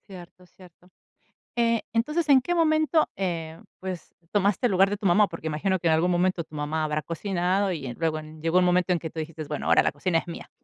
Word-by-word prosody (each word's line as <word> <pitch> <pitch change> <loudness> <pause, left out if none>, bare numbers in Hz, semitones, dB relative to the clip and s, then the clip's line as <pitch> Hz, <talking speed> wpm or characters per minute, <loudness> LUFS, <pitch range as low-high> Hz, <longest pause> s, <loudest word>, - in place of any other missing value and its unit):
Cierto, 180 -1 -12
cierto. 180 0 -19 0.7
Eh, 230 -1 +2
entonces, 300 +8 0
¿en 275 -2 +7
qué 350 +7 -2
momento, 315 -1 +2
eh, 165 -4 -4 0.2
pues, 185 -3 -7 0.2
tomaste 205 +3 +2
el 230 - 0
lugar 190 +1 +4
de 205 - -1
tu 205 0 -4
mamá? 205 +4 +5
Porque 165 -3 -6
imagino, 185 +5 0
que 170 - 0
en 160 - +4
algún 170 +3 +2
momento 180 -1 +1
tu 155 - -17
mamá 150 +1 -2
habrá 150 0 -1
cocinado, 185 +3 -1
y 150 -6 -5
en 120 -2 -6
luego 160 -1 -1
llegó 160 +3 -1
un 185 - +4
momento 180 0 +2
en 175 - +1
que 160 -1 -6
tú 160 - -10
dijiste: 160 0 -5
"Bueno, 150 0 -5
ahora - - +5
la - - 0
cocina 165 +4 0
es - - -5
mía". 170 - -8
180 Hz, 230 wpm, -26 LUFS, 160-200 Hz, 0.7 s, en